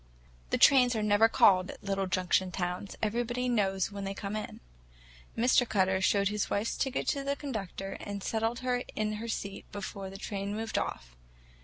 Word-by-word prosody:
The - - +1
trains 250 -3 +6
are 215 - 0
never 210 +2 +5
called 185 -4 +5
at - - -10
little 195 -1 -1
junction 185 0 +1
towns; 180 +1 -3
everybody 240 +3 0
knows 195 -5 +1
when 200 0 -6
they 195 0 -4
come 200 +1 -4
in. 215 - -5 0.8
Mr. 245 +1 +3
Cutter 190 -1 +2
showed 200 +1 +3
his 210 -1 -2
wife's 205 +3 -1
ticket 265 -1 -1
to 280 -2 -1
the 280 +1 -1
conductor, 200 - -5
and 200 -1 -6
settled 225 +2 -1
her 250 -1 0
in 215 0 -1
her 230 - -5
seat 200 -3 -5
before 200 -1 -6
the 195 - -9
train 200 0 -4
moved 220 0 -1
off. - - -5
205 Hz, 180 wpm, -30 LUFS, 195-230 Hz, 0.8 s, trains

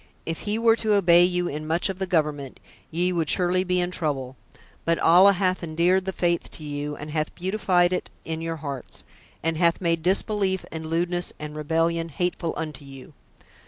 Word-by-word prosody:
If 165 0 -3
he 210 - 0
were 225 0 +4
to 215 -2 +1
obey 175 -3 +6
you 180 -1 0
in 155 0 -5
much 165 +2 +1
of 190 -1 -5
the 190 - -2
government, 150 -6 -1 0.3
ye 175 +3 0
would 165 -3 -1
surely 180 0 +2
be 180 -1 0
in 175 0 -1
trouble; 135 -7 -3 0.5
but 165 0 +1
Allah 185 +4 +6
hath 185 -1 0
endeared 170 +3 +1
the 190 - -1
faith 175 -2 0
to 155 - -9
you 145 0 -4
and 150 +1 -8
hath 155 0 -2
beautified 185 -2 +1
it - - -3 0.2
in 160 0 -4
your 165 0 -3
hearts, 140 -4 -7 0.4
and 165 0 0
hath 170 0 +3
made 165 -2 0
disbelief 190 +1 +1
and 160 -1 -6
lewdness 175 +2 -1
and 150 0 -7
rebellion 165 +2 0
hateful 175 +1 -2
unto 155 -3 -5
you. 135 -2 -12
170 Hz, 190 wpm, -25 LUFS, 155-180 Hz, 0.5 s, obey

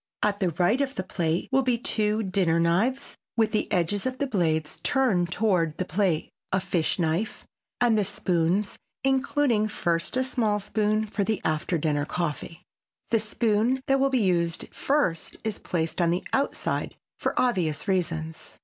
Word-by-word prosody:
At 205 -1 +1
the 185 -3 +2
right 185 - +2
of 275 0 -1
the 190 - -2
plate 170 -2 -1
will 265 +1 +4
be 250 -2 +1
two 215 -2 0
dinner 185 -4 +1
knives 190 +11 +1 0.2
with 220 -1 +3
the 215 - -1
edges 190 +6 +1
of 260 0 -3
the 280 - 0
blades 160 - 0
turned 190 -11 +2
toward 180 -6 +1
the 185 - -1
plate, 180 -3 0 0.2
a 190 - +2
fish 170 -3 0
knife, 170 +5 -1 0.3
and 240 -2 +4
the 210 - +3
spoons, 180 +2 0 0.2
including 265 -4 +2
first 170 -1 -1
a 260 - +2
small 225 -5 0
spoon 215 +1 0
for 205 -1 -2
the 215 0 0
after 155 +2 0
dinner 150 -2 0
coffee. 165 0 -4 0.5
The 225 - +4
spoon 220 +3 +1
that 270 0 +2
will 275 0 +3
be 255 -4 +2
used 170 -3 0
first 270 - 0
is 220 -2 -2
placed 165 0 -2
on 170 - +3
the 175 +2 0
outside 275 +1 -1 0.2
for - - -1
obvious 180 - 0
reasons. 165 -4 -2
200 Hz, 165 wpm, -26 LUFS, 170-230 Hz, 0.5 s, will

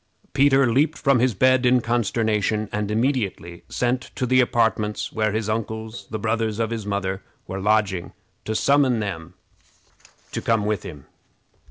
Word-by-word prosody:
Peter 135 -1 +4
leaped 150 +5 +2
from 140 -3 +3
his 125 -2 +2
bed 130 +4 +4
in 125 0 +4
consternation, 110 -2 0
and 105 -1 -2
immediately 105 -7 -1
sent 125 +1 0
to 125 - -1
the 130 +1 +4
apartments 110 -3 0
where 110 -1 +1
his 110 0 -2
uncles, 110 -1 -4
the 110 - -3
brothers 110 0 -1
of 115 0 -1
his 110 -3 -4
mother, 95 -1 -2 0.2
were 95 +1 -5
lodging, 105 -3 +1 0.3
to 110 - -3
summon 140 -2 +3
them 85 -6 -5 1.0
to - - -3
come 115 -3 +1
to 105 - +2
him. 70 -3 -10
110 Hz, 155 wpm, -23 LUFS, 105-125 Hz, 1.0 s, Peter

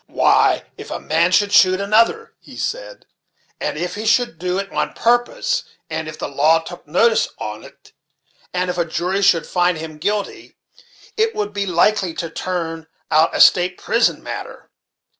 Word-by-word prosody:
"Why, - - +3 0.2
if - - -9
a - - -4
man 165 +3 +1
should 205 +3 +2
shoot 185 -2 +5
another," 230 - +1
he - - -14
said, - - -5 0.5
"and - - -3
if 175 +2 -3
he 215 +3 -5
should 225 -7 +1
do 180 +1 -2
it 195 0 -4
on - - -2
purpose 485 - +1 0.3
and 160 0 -3
if 155 0 -8
the - - -4
law 150 +4 +3
took 165 0 -9
notice 220 +9 +3
on't, 105 0 -9 0.6
and 180 0 -1
if 175 - -5
a 170 - +1
jury 180 +4 -2
should 170 -4 +3
find 180 -1 +1
him 155 -1 -8
guilty, 205 +4 -3 0.6
it 445 +1 +1
would 205 0 -3
be 200 -1 -2
likely 180 0 +1
to 165 -2 -5
turn 165 -3 -4 0.2
out 155 +2 +3
a - - -1
state 180 0 +5
prison 235 0 +1
matter." - - -8
180 Hz, 170 wpm, -19 LUFS, 165-210 Hz, 0.6 s, shoot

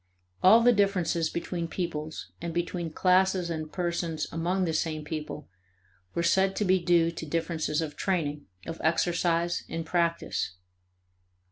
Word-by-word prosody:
All 220 +5 +8
the 245 +1 +6
differences 185 -5 +1
between 170 0 -3
peoples 160 -3 -4
and 170 -1 -4
between 175 -1 -2
classes 185 +1 +2
and 155 -1 -4
persons 170 -3 -2
among 180 +3 0
the 165 - -1
same 155 -1 -1
people 150 -1 -5 0.7
were 170 - +1
said 190 +3 +3
to 210 - 0
be 185 0 +4
due 170 -1 +3
to 165 - -7
differences 160 0 -1
of 150 -2 -6
training, 150 -6 -1 0.2
of 165 - -6
exercise, 170 +1 +1
and 165 0 -4
practice. 170 - -1
170 Hz, 140 wpm, -28 LUFS, 160-180 Hz, 0.7 s, All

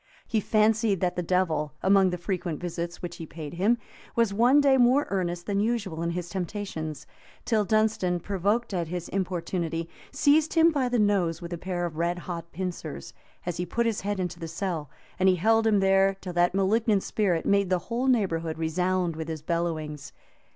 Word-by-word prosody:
He 225 - +1
fancied 215 -1 +2
that 180 -1 0
the 180 - -1
devil, 165 -4 0
among 195 0 +5
the 180 - -3
frequent 175 -3 -3
visits 170 0 -5
which 175 0 -5
he 165 - -7
paid 150 -2 -8
him, 200 +7 +2 0.4
was 230 -4 +2
one 245 +7 +5
day 280 -2 +5
more 255 +3 +4
earnest 175 -2 -2
than 200 -1 0
usual 205 -7 -1
in 170 - -1
his 175 0 -3
temptations, 175 -4 -5 0.4
till 220 -3 +2
Dunstan, 215 -5 +1
provoked 205 +5 -1
at 170 -3 -1
his 175 +1 -5
importunity, 175 -3 -2 0.2
seized 300 +3 +3
him 330 0 +6
by 270 -5 0
the 245 - +1
nose 195 -6 +2
with 170 0 -7
a - - -3
pair 180 -1 -2
of 160 -3 -5
red 170 +1 0
hot 170 -1 -6
pincers, 175 - -5 0.3
as 175 -1 -3
he 175 - -1
put 235 +7 0
his 225 -3 0
head 205 0 -2
into 180 -2 -3
the 165 - -5
cell; 165 -3 -3 0.3
and 190 +1 +5
he 185 - +4
held 225 +5 +3
him 205 -3 +3
there 195 0 +4
till 180 -2 -6
that 175 +1 +2
malignant 205 +1 +2
spirit 185 -6 0
made 200 -2 +2
the 185 - +3
whole 245 +3 0
neighborhood 165 -10 +1
resound 180 +1 0
with 160 0 -5
his 160 -2 -5
bellowings. 155 -4 -3
185 Hz, 195 wpm, -27 LUFS, 170-210 Hz, 0.4 s, him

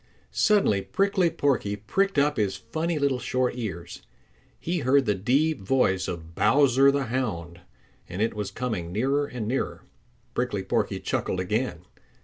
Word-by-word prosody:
Suddenly 200 - +3
Prickly 190 - +1
Porky 125 -10 0
pricked 195 - -1
up 145 0 +3
his 100 -3 0
funny 155 - -3
little 140 -3 +1
short 125 +1 0
ears. 90 -8 -6 0.6
He 175 +1 -2
heard 135 0 +3
the 105 - +2
deep 135 +11 +1
voice 95 -4 +1
of 85 -2 -6
Bowser 135 +4 +4
the 140 0 +1
Hound, 90 -9 -3 0.5
and 90 +2 -6
it 115 +2 +1
was 105 -2 -3
coming 100 -6 -3
nearer 135 +8 +1
and 120 -5 -5
nearer. 130 +4 -2 0.5
Prickly - - -1
Porky - - -1
chuckled 90 - -2
again. 95 -2 -2
125 Hz, 145 wpm, -26 LUFS, 95-140 Hz, 0.6 s, Bowser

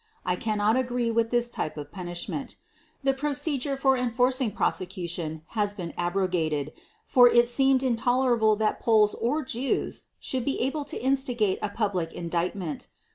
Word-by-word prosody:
I 180 - +1
can 215 +3 -2
not 210 +2 +3
agree 245 -2 0
to 230 0 +4
this 240 +1 0
type 155 - -4
of 145 -1 -7
punishment.... 180 +9 -5 0.5
The 270 0 +3
procedure 280 0 -1
for 270 0 +3
enforcing 250 0 +1
prosecution 175 -6 -2
has 205 -2 -1
been 175 -5 -6
abrogated, 175 -5 -1 0.3
for 245 -1 +6
it 240 0 +5
seemed 265 +1 +3
intolerable 245 -2 +2
that 215 0 0
Poles 215 -2 +4
or 285 +5 -1
Jews 255 +1 -2
should 260 -2 -3
be 275 - -1
able 280 +4 -1
to 285 - -4
instigate 250 -6 +1
a 210 - -1
public 195 -6 -2
indictment. 170 -1 -3
230 Hz, 150 wpm, -27 LUFS, 185-260 Hz, 0.5 s, for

